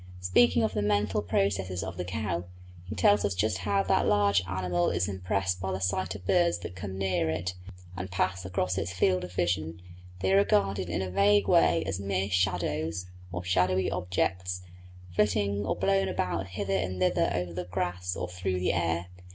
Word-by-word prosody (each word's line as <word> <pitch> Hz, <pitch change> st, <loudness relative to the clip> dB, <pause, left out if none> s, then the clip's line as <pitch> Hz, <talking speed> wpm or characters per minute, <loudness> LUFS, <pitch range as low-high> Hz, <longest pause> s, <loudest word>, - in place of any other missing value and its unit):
Speaking 110 Hz, +6 st, +4 dB
of 110 Hz, -, 0 dB
the -, -, 0 dB
mental 105 Hz, -1 st, +1 dB
processes 95 Hz, 0 st, 0 dB
of 95 Hz, -, -5 dB
the 90 Hz, -, -3 dB
cow, 90 Hz, -2 st, -3 dB, 0.4 s
he 105 Hz, -, -5 dB
tells 100 Hz, +1 st, +4 dB
us 100 Hz, -2 st, 0 dB
just 95 Hz, 0 st, 0 dB
how 100 Hz, +1 st, +1 dB
that 95 Hz, -, +2 dB
large 100 Hz, -2 st, +3 dB
mammal 90 Hz, -1 st, 0 dB
is 85 Hz, +1 st, 0 dB
impressed 95 Hz, -1 st, -1 dB
by 95 Hz, +1 st, -2 dB
the 95 Hz, -, -2 dB
sight 95 Hz, 0 st, -1 dB
of 95 Hz, -2 st, -10 dB
birds 85 Hz, -1 st, +3 dB
that 90 Hz, 0 st, -7 dB
come 95 Hz, 0 st, -6 dB
near 95 Hz, -4 st, 0 dB
it 85 Hz, +3 st, -2 dB, 0.4 s
and 90 Hz, +1 st, -5 dB
pass 95 Hz, +1 st, -1 dB
across 90 Hz, 0 st, -1 dB
its 90 Hz, 0 st, -3 dB
field 90 Hz, 0 st, +2 dB
of 90 Hz, -, -7 dB
vision; 85 Hz, -2 st, -1 dB, 0.4 s
they 95 Hz, 0 st, +2 dB
are -, -, +6 dB
regarded 100 Hz, -2 st, +2 dB
in 85 Hz, +2 st, -1 dB
a 95 Hz, -, -4 dB
vague 100 Hz, +1 st, +4 dB
way 80 Hz, -2 st, +4 dB
as 95 Hz, 0 st, -2 dB
mere 100 Hz, 0 st, -1 dB
shadows, 90 Hz, -2 st, 0 dB, 0.3 s
or 90 Hz, 0 st, -4 dB
shadowy 90 Hz, +1 st, +2 dB
objects, 90 Hz, 0 st, -1 dB, 0.5 s
flitting 100 Hz, 0 st, +1 dB
or -, -, +1 dB
blown 195 Hz, 0 st, +2 dB
about 95 Hz, -, -2 dB
hither 95 Hz, +1 st, -3 dB
and 95 Hz, -1 st, -1 dB
thither 90 Hz, -, +2 dB
over 90 Hz, -1 st, -2 dB
the 90 Hz, +1 st, -4 dB
grass 90 Hz, 0 st, -2 dB
or 90 Hz, -, -3 dB
through 90 Hz, +1 st, -2 dB
the 90 Hz, -, +1 dB
air. 85 Hz, -1 st, 0 dB
95 Hz, 190 wpm, -28 LUFS, 90-100 Hz, 0.5 s, are